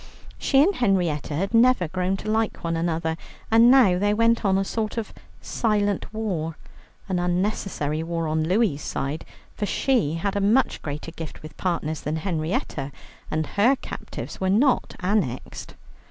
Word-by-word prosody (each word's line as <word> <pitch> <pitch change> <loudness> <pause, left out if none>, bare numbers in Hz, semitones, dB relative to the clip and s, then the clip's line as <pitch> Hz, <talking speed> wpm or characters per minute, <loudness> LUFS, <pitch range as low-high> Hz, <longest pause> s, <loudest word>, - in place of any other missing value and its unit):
She 275 0 +4
and 390 +6 +3
Henrietta 175 - 0
had 195 +8 -2
never 230 -5 +4
grown 185 +3 -1
to 210 - -8
like 220 0 0
one 165 0 -1
another, 165 -1 -1 0.3
and 230 +2 +7
now 235 -9 +6
there 205 +1 +2
went 230 +1 +3
on 190 -2 +3
a 195 - 0
sort 220 +2 -3
of 225 - -4 0.3
silent 205 -3 0
war, 180 -8 -3 0.5
an 185 -2 0
unnecessary 175 -4 -1
war 165 0 -2
on 155 0 0
Louie's 185 -6 +2
side, 140 +4 -3 0.3
for 205 - -2
she 215 - +1
had 195 +4 -2
a 200 - +1
much 225 +7 +2
greater 150 +2 -5
gift 160 -2 -8
with 155 - -10
partners 160 -4 -2
than 150 +2 -2
Henrietta, 155 -4 -2 0.4
and 155 0 -1
her 220 - +3
captives - - -8
were 190 - +1
not 245 +7 +2
annexed. 180 - -2
185 Hz, 160 wpm, -24 LUFS, 160-215 Hz, 0.5 s, and